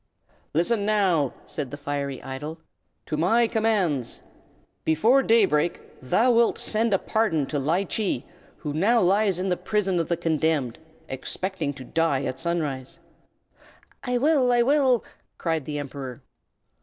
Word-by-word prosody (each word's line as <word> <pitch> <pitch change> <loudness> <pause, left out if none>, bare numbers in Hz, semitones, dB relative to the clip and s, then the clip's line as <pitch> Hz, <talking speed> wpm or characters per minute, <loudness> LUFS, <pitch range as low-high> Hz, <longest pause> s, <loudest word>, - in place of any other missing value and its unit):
"Listen, 200 +6 +2
now," 190 -10 +2
said 145 -4 -5
the 145 - -7
Fiery 140 -2 -4
Idol, 145 +4 -6 0.5
"to 155 - -3
my 225 +9 +3
commands. 210 - 0 0.6
Before 220 - +4
day 230 -4 +4
break 160 0 0 0.2
thou 225 - +3
wilt 235 0 +3
send 225 +1 +1
a 195 - +4
free - - -20
pardon 190 -10 +1
to 145 +1 -2
Ly 165 +8 +1
Chee, 205 +1 -2 0.3
who 150 -2 -5
now 210 +10 +3
lies 195 0 +3
in 185 +1 -1
the 180 - +1
prison 195 -4 0
of 165 - -1
the 170 - +1
condemned, 155 -6 0 0.3
expecting 170 +4 -3
to 135 -1 -10
die 160 -1 0
at 130 -1 -3
sunrise." 155 -3 -2 1.1
"I 250 -2 0
will! 270 -2 +3
I 240 -1 +4
will!" 265 -2 +3 0.3
cried 160 -4 -1
the 150 -1 -4
Emperor. 135 -3 -7
170 Hz, 150 wpm, -25 LUFS, 145-220 Hz, 1.1 s, Before